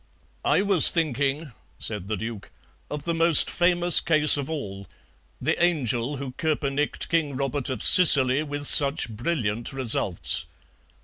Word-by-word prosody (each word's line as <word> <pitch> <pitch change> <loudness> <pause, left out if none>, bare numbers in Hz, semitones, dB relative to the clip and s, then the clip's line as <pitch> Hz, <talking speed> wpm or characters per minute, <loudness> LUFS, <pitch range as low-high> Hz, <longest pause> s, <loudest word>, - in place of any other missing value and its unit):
"I - - 0
was 195 -5 +6
thinking," 145 -1 -4 0.3
said 105 -4 -4
the 110 0 -5
Duke, 110 -1 -9 0.4
"of 150 -1 -8
the 170 - -4
most 165 -1 +5
famous 175 0 +4
case 155 -1 +3
of 140 -1 -6
all, 100 -11 -8 0.5
the - - -3
angel 140 -5 -2
who 135 -1 -8
koepenicked 150 0 -4
King 155 -4 -3
Robert 135 0 -5
of 130 -5 -5
Sicily 140 -6 +5
with 145 -1 -7
such 140 -3 +2
brilliant 115 -2 -5
results. 115 -8 -2
140 Hz, 135 wpm, -22 LUFS, 120-160 Hz, 0.5 s, was